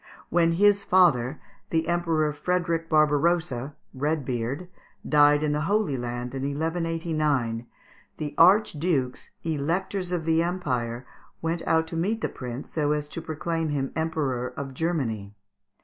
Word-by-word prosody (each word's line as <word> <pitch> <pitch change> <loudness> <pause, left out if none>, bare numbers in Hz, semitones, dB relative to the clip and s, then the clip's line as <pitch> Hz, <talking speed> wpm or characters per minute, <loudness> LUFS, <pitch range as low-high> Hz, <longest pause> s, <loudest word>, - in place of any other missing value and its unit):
When 170 0 +3
his 200 +3 +4
father, 155 -8 +3 0.3
the 165 0 0
Emperor 165 -3 +1
Frederick 170 0 -1
Barbarossa 155 -3 +2 0.2
(Red 145 +1 -1
beard), 125 +7 -3 0.4
died 145 0 +5
in 150 - +1
the 150 0 0
Holy 205 -9 +2
Land, 120 0 -4
in 135 - -3
1189, 155 -5 -1 0.5
the 150 -1 -4
Archdukes, 165 -8 +3
Electors 175 +5 -1
of 175 -3 -1
the 165 0 +3
Empire, 130 -9 -2 0.3
went 165 +1 -2
out 160 0 +3
to 160 - -7
meet 205 +7 0
the - - 0
prince 125 +1 -7
so 150 -2 +1
as 150 -1 -2
to 165 - -6
proclaim 160 +1 -2
him 135 -2 -1
Emperor 150 -6 -1
of 135 -1 -5
Germany. 125 -11 -2
155 Hz, 135 wpm, -26 LUFS, 135-170 Hz, 0.5 s, died